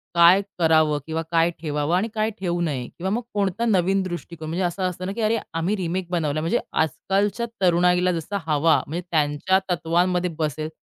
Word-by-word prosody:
काय 170 +3 +7 0.2
करावं 155 -2 +3
किंवा 160 0 -2
काय 165 0 +3
ठेवावं 150 +1 -1
आणि 190 +5 +1
काय 215 -1 0
ठेवू 175 -2 -1
नये? 140 -7 -2
किंवा 185 +2 -2
मग 230 +4 0
कोणता 200 +2 0
नवीन 195 -2 +2
दृष्टिकोन 170 -3 -6
म्हणजे 175 +4 -1
असं 175 +2 -2
असतं 180 +1 -7
ना, 190 - -3
की 225 - -4
अरे 220 +1 +2 0.2
आम्ही 165 +5 0
रिमेक 180 0 -2
बनवलाय. 155 -4 0
म्हणजे 170 +10 +1
आजकालच्या 195 - 0 0.2
तरुणाईला 180 0 +3
जसा 170 +4 -3
हवा 155 +1 +3
म्हणजे 170 +4 -3
त्यांच्या 155 +4 +2
तत्वांमध्ये 180 +1 +1
बसेल, 155 0 -2
175 Hz, 175 wpm, -23 LUFS, 160-190 Hz, 0.2 s, काय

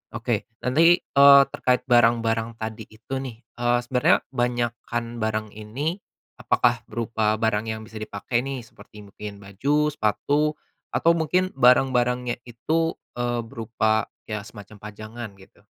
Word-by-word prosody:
Oke, - - -2 0.2
nanti, 165 +7 +5
eee, 140 0 +7
terkait 125 -1 +1
barang-barang 115 -1 +2
tadi 110 -1 -6
itu 110 +4 -11
nih. 125 -4 -7 0.2
Eee, 120 0 +3
sebenarnya 125 0 +2
banyakan 120 -1 -2
barang 110 -1 -2
ini, 135 - -4 0.4
apakah 120 -2 +2
berupa 110 -1 0
barang 110 0 0
yang 110 0 -5
bisa 110 -1 -9
dipakai 110 +3 -2
nih? 130 -2 -5
Seperti 105 -2 -15
mungkin 100 +1 -9
baju, 140 +10 0
sepatu, 145 +7 0 0.3
atau 170 - +3
mungkin 180 +3 0
barang-barangnya 125 -1 +3
itu, 160 +8 -1 0.2
eee, 120 -1 -1
berupa 110 -1 -1 0.2
ya 105 -1 -4
semacam 105 0 -12
pajangan, 110 +2 -8
gitu? 95 - -20
120 Hz, 130 wpm, -24 LUFS, 110-130 Hz, 0.4 s, eee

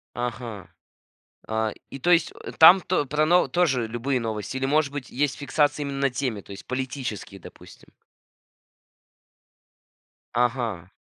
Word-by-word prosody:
Ага. 120 -4 -5 0.8
А, 110 -1 -1 0.2
и 135 - -7
то 175 - 0
есть, 170 - +4
э, - - -6
там 175 +4 +9
то 175 -6 0
про 150 +3 +1
но 175 +3 +4
тоже 135 -10 +1
любые 125 +3 -1
новости, 110 +2 -4
или 135 - -1
может 145 0 +2
быть 140 -4 -6
есть 140 0 -1
фиксация 145 +1 +1
именно 140 -1 0
темы, 125 -5 -3
то - - -15
есть 100 - -9
политические, 130 -6 -5
допустим? - - -15 2.5
Ага. 120 -7 -1
130 Hz, 135 wpm, -25 LUFS, 115-145 Hz, 2.5 s, там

